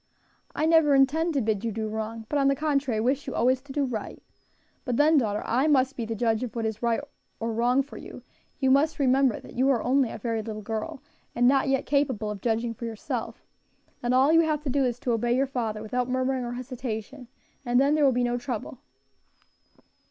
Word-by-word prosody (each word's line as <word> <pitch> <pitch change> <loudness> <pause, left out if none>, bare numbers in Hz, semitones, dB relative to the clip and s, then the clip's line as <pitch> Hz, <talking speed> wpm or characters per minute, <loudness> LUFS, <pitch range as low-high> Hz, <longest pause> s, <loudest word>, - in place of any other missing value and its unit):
"I 305 - +1
never 320 -3 +5
intend 310 +5 +2
to 275 - +2
bid 215 -2 -1
you 230 - -1
do 220 +1 -3
wrong, 220 +1 -5
but, 290 - 0
on 275 - +3
the 275 - +3
contrary, 275 -6 0
wish 260 +6 0
you 265 - -4
always 255 +2 +2
to 275 0 -12
do 285 +1 0
right. 240 -5 -5 0.6
But 245 -3 -2
then, 300 +1 +5
daughter, 210 -4 -1
I 260 +6 +1
must 270 -2 +3
be 235 - -3
the 225 0 -4
judge 225 0 0
of 250 -2 -5
what 230 -1 -2
is 220 -1 -3
wrong 235 +2 +1 0.4
or 230 0 -2
right 245 +4 +2
for 285 - -11
you; - - -10 0.3
you 265 -1 +2
must 295 +4 +3
remember 265 -3 +2
that - - -13
you 260 +3 +2
are 250 -5 +2
only 260 0 +2
a - - -6
very 230 -2 -2
little 215 -1 -6
girl, 220 +4 -5 0.3
and 245 +1 +4
not 270 +2 +3
yet 270 -1 +1
capable 260 -7 0
of 200 -2 -7
judging 230 0 0
for 235 - -7
yourself, 225 -2 -5 0.6
and 245 +1 +1
all 270 +4 +4
you 330 - +6
have 305 -2 -1
to 280 - -2
do 280 +1 +2
is 245 -1 -1
to 245 - -1
obey 235 +1 +1
your 270 +2 +2
father 225 -5 -3
without 250 +3 -2
murmuring 255 0 0
or 240 - -4
hesitation, 250 0 -6 0.4
and 245 -1 +2
then 280 +2 +3
there 305 -1 +2
will 275 - +5
be 245 0 0
no 245 0 0
trouble." 245 -1 -5
250 Hz, 225 wpm, -26 LUFS, 230-275 Hz, 0.6 s, you